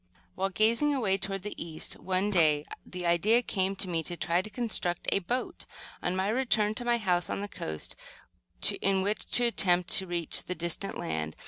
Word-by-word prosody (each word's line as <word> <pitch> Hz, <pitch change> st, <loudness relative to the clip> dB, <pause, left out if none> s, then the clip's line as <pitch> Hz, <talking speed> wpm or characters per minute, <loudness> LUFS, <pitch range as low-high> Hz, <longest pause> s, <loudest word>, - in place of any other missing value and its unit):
While 195 Hz, +1 st, -1 dB
gazing 230 Hz, +9 st, +2 dB
away 195 Hz, -7 st, 0 dB
toward 195 Hz, -1 st, -3 dB
the 210 Hz, -, -5 dB
east 160 Hz, -2 st, -2 dB
one 190 Hz, +2 st, -1 dB
day, 155 Hz, -5 st, +3 dB, 0.2 s
the 180 Hz, -1 st, -7 dB
idea 210 Hz, +8 st, +3 dB
came 195 Hz, -2 st, -1 dB
to 190 Hz, -, +3 dB
me 170 Hz, -2 st, -1 dB
to 175 Hz, +2 st, -6 dB
try 170 Hz, +2 st, +1 dB
to 215 Hz, -, -9 dB
construct 210 Hz, -7 st, -2 dB
a -, -, +2 dB
boat, 245 Hz, +7 st, -4 dB, 0.4 s
on 180 Hz, -, -1 dB
my 190 Hz, +1 st, 0 dB
return 215 Hz, -3 st, +1 dB
to 245 Hz, -, -4 dB
my 240 Hz, 0 st, +2 dB
house 180 Hz, -5 st, 0 dB
on -, -, -3 dB
the 205 Hz, -, -4 dB
coast, 80 Hz, -, -6 dB, 0.9 s
in 195 Hz, -1 st, +2 dB
which 205 Hz, +2 st, -3 dB
to 245 Hz, -, +5 dB
attempt 180 Hz, -6 st, +2 dB
to 190 Hz, -, +6 dB
reach 175 Hz, -2 st, 0 dB
the 180 Hz, -, -4 dB
distant 175 Hz, +4 st, -1 dB
land. 80 Hz, 0 st, -4 dB
190 Hz, 195 wpm, -29 LUFS, 175-215 Hz, 0.9 s, to